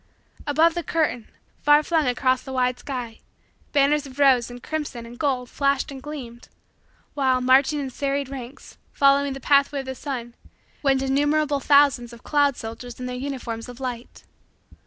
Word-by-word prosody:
Above 320 Hz, +3 st, +4 dB
the 345 Hz, -, -2 dB
curtain, 310 Hz, -9 st, -1 dB, 0.3 s
far 295 Hz, +1 st, +5 dB
flung 320 Hz, -3 st, +1 dB
across 255 Hz, +1 st, +1 dB
the 265 Hz, -, -9 dB
wide 250 Hz, -1 st, 0 dB
sky, 245 Hz, -5 st, -6 dB, 0.5 s
banners 290 Hz, 0 st, +2 dB
of 265 Hz, 0 st, -13 dB
rose 265 Hz, -4 st, +4 dB
and 245 Hz, 0 st, -10 dB
crimson 295 Hz, -7 st, -4 dB
and 240 Hz, +1 st, -12 dB
gold 260 Hz, -4 st, 0 dB
flashed 280 Hz, +2 st, 0 dB
and 270 Hz, -1 st, -8 dB
gleamed; 260 Hz, -5 st, -8 dB, 0.7 s
while, 260 Hz, -3 st, +2 dB
marching 265 Hz, +4 st, +4 dB
in 270 Hz, -2 st, -4 dB
serried 280 Hz, +1 st, -2 dB
ranks, 265 Hz, -1 st, -10 dB
following 280 Hz, 0 st, +3 dB
the 270 Hz, -, -7 dB
pathway 280 Hz, +1 st, +3 dB
of -, -, -12 dB
the 265 Hz, -, -4 dB
sun, 250 Hz, -3 st, -6 dB, 0.5 s
went 270 Hz, -2 st, +2 dB
innumerable 290 Hz, +2 st, +1 dB
thousands 275 Hz, -4 st, +3 dB
of 235 Hz, -, -14 dB
cloud 285 Hz, -3 st, +2 dB
soldiers 230 Hz, +2 st, -8 dB
in 250 Hz, -, -5 dB
their 250 Hz, 0 st, -4 dB
uniforms 250 Hz, -3 st, -5 dB
of 245 Hz, +1 st, -10 dB
light. 250 Hz, -2 st, -6 dB
270 Hz, 165 wpm, -24 LUFS, 250-285 Hz, 0.7 s, far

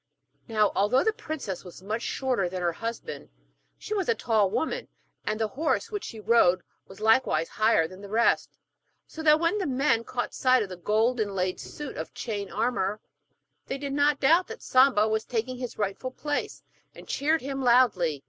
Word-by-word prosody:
Now, 215 Hz, -3 st, +2 dB
although 220 Hz, +7 st, +3 dB
the 440 Hz, -, +2 dB
princess 290 Hz, -, -5 dB
was 180 Hz, 0 st, -12 dB
much 215 Hz, +4 st, -3 dB
shorter 245 Hz, -8 st, -1 dB
than 180 Hz, 0 st, -4 dB
her 175 Hz, -, +2 dB
husband, 225 Hz, -7 st, -6 dB, 0.5 s
she -, -, -5 dB
was 395 Hz, -1 st, -1 dB
a 460 Hz, -, +3 dB
tall 215 Hz, -, +2 dB
woman, 320 Hz, -, -2 dB, 0.4 s
and 215 Hz, -, -1 dB
the 220 Hz, -1 st, 0 dB
horse 310 Hz, -, -1 dB
which 415 Hz, -2 st, -4 dB
she 225 Hz, -, -8 dB
rode 205 Hz, -5 st, +3 dB, 0.2 s
was 190 Hz, -, -13 dB
likewise 220 Hz, -8 st, +3 dB
higher 215 Hz, -7 st, +2 dB
than 185 Hz, +3 st, -12 dB
the 200 Hz, -, -9 dB
rest, 225 Hz, +3 st, +1 dB, 0.5 s
so 320 Hz, -, -9 dB
that 305 Hz, -1 st, +5 dB
when 335 Hz, +5 st, +1 dB
the 380 Hz, -, -1 dB
men 260 Hz, -3 st, +1 dB
caught 245 Hz, +1 st, -4 dB
sight 255 Hz, -2 st, +3 dB
of 200 Hz, -, -7 dB
the 185 Hz, -, -6 dB
gold 220 Hz, +7 st, +1 dB
inlaid 195 Hz, -3 st, -1 dB
suit 295 Hz, -2 st, -7 dB
of -, -, -6 dB
chain 205 Hz, -4 st, -4 dB
armour, 215 Hz, -2 st, -1 dB, 0.7 s
they 270 Hz, -, -3 dB
did 280 Hz, 0 st, -4 dB
not 285 Hz, 0 st, +2 dB
doubt 330 Hz, +7 st, +4 dB
that 455 Hz, +1 st, -9 dB
Samba 255 Hz, -5 st, +4 dB
was 220 Hz, 0 st, 0 dB
taking 250 Hz, +2 st, -3 dB
his 250 Hz, -2 st, -6 dB
rightful 205 Hz, +5 st, -2 dB
place, 290 Hz, +3 st, -4 dB, 0.3 s
and -, -, -13 dB
cheered 310 Hz, +3 st, +1 dB
him 270 Hz, 0 st, -4 dB
loudly. 235 Hz, -, +3 dB
230 Hz, 185 wpm, -27 LUFS, 205-275 Hz, 0.7 s, that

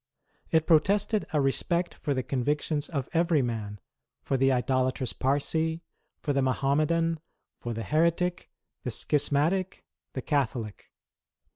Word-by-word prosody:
It 160 Hz, -1 st, +3 dB
protested 200 Hz, +6 st, +3 dB
a 150 Hz, -, +2 dB
respect 170 Hz, +6 st, 0 dB
for 145 Hz, -3 st, -2 dB
the 130 Hz, -, -1 dB
convictions 145 Hz, +3 st, -1 dB
of 140 Hz, -5 st, -2 dB
every 165 Hz, -4 st, +3 dB
man, 105 Hz, -4 st, -4 dB, 0.4 s
for 135 Hz, -, 0 dB
the 135 Hz, +1 st, +3 dB
idolatrous 130 Hz, 0 st, 0 dB
Parsee, 160 Hz, +4 st, 0 dB, 0.4 s
for 145 Hz, -, 0 dB
the 140 Hz, -, +2 dB
Mahommedan, 155 Hz, +5 st, +1 dB, 0.4 s
for 120 Hz, -1 st, -4 dB
the 115 Hz, -, -3 dB
Heretic, 170 Hz, +4 st, +1 dB, 0.3 s
the -, -, -3 dB
Schismatic, 150 Hz, +6 st, 0 dB, 0.3 s
the 130 Hz, -, -4 dB
Catholic. 120 Hz, -7 st, -2 dB
145 Hz, 125 wpm, -28 LUFS, 130-165 Hz, 0.4 s, It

